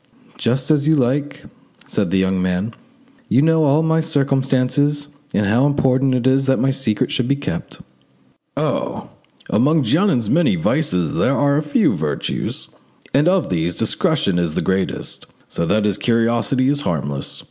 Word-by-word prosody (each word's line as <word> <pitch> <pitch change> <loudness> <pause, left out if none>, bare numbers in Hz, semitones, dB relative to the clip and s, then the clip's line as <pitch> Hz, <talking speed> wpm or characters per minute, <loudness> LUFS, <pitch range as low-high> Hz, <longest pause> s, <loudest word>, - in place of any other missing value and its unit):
"Just 130 +5 0
as 150 -1 +2
you 160 - +4
like," 140 +2 -1 0.4
said 100 -4 -1
the 95 - +1
young 95 0 +1
man; 95 +5 -1 0.6
"you - - +3
know 160 +1 +3
all 145 +3 +3
my 160 0 +2
circumstances 140 -1 0 0.2
and 105 - 0
how 120 +8 +3
important 135 -2 +2
it 125 -1 -1
is 135 +1 +2
that 135 - +3
my 135 - +1
secret 130 -6 -1
should 125 - 0
be 140 - +2
kept." 140 - -6 0.8
"Oh! - - -2 0.4
among 145 +8 +3
Jeannin's 150 - +1
many 175 - +2
vices 150 - 0
there 135 - +1
are 140 0 +2
a 150 - +1
few 175 - +1
virtues, 75 -1 -3 0.5
and 145 +4 +3
of 185 - +1
these 85 0 -1
discretion 115 - 0
is 85 -3 -2
the - - -1
greatest, 95 0 -2 0.2
so 85 - -2
that 105 +3 +1
his 105 -1 0
curiosity 120 +2 +1
is 145 +1 +1
harmless. 70 - -3
130 Hz, 160 wpm, -19 LUFS, 105-145 Hz, 0.8 s, you